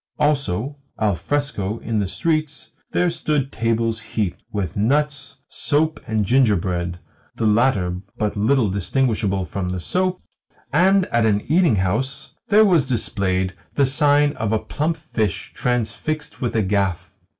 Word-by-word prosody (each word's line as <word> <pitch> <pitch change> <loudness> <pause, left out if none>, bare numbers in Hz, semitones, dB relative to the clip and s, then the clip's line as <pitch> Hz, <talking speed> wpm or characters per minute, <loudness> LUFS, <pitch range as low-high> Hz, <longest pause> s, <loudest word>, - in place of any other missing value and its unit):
Also, 140 -2 0 0.2
al 105 -2 +2
fresco 110 - -2
in 115 -1 -2
the 100 - 0
streets 155 - -2 0.2
there 180 -1 +2
stood 150 -5 -1
tables 115 0 0
heaped 110 -4 -3
with 100 -3 -3
nuts, 145 +7 0
soap, 155 +2 0
and 110 -2 0
gingerbread 90 -8 +1 0.4
(the 115 - -1
latter 105 -5 +2 0.2
but 105 -1 -1
little 110 +3 +2
distinguishable 100 -1 0
from 90 0 -4
the 90 0 -3
soap), 185 - 0 0.5
and 190 +4 +4
at 115 -1 +3
an 105 -1 +2
eating 160 - +3
house 110 +9 -1 0.2
there 215 +1 +6
was 170 -9 +3
displayed 95 -6 0 0.2
the 140 - +4
sign 145 +1 +4
of 110 -2 -1
a 110 - +3
plump 155 +8 -2
fish 110 - -3
transfixed 125 +6 -2
with 120 -2 -1
a 110 - +2
gaff. 95 -3 -1
115 Hz, 140 wpm, -21 LUFS, 100-145 Hz, 0.5 s, there